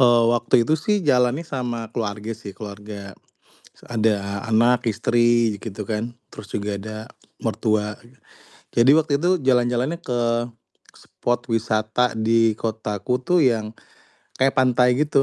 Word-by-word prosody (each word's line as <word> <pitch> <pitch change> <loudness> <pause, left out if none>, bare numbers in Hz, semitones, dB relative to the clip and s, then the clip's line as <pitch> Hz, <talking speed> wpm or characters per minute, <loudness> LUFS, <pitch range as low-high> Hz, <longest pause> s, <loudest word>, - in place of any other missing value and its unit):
Eee, 120 -2 +5
waktu 120 - -1
itu 155 - +2
sih 210 - +2
jalannya 125 +4 +2
sama 120 -3 -3
keluarga 105 -1 -3
sih, 100 -3 -8
keluarga, 105 -1 -8 0.8
s - - -22
ada 110 -1 +3 0.4
anak, 120 +3 +4
istri 120 +3 +2 0.3
ji - - -16
gitu 105 -2 -5
kan, 105 0 -1 0.3
terus 100 - -10
juga 100 +1 -2
ada 110 +1 -7 0.5
mertua 105 -1 0 0.2
gi 125 - -23 0.6
jadi 120 +3 +6
waktu 155 -2 0
itu 175 +5 +1 0.2
jalan-jalannya 125 +5 +2
ke 125 -1 0 0.8
spot 120 0 -2
wisata 110 +1 +1 0.2
di 115 0 +4 0.2
kotaku 110 0 -2
tuh 180 -1 +4
yang 110 -2 -3 0.7
kayak 135 +1 +3
pantai 125 -1 +4
gitu. 145 -2 +2
115 Hz, 140 wpm, -22 LUFS, 110-125 Hz, 0.8 s, jadi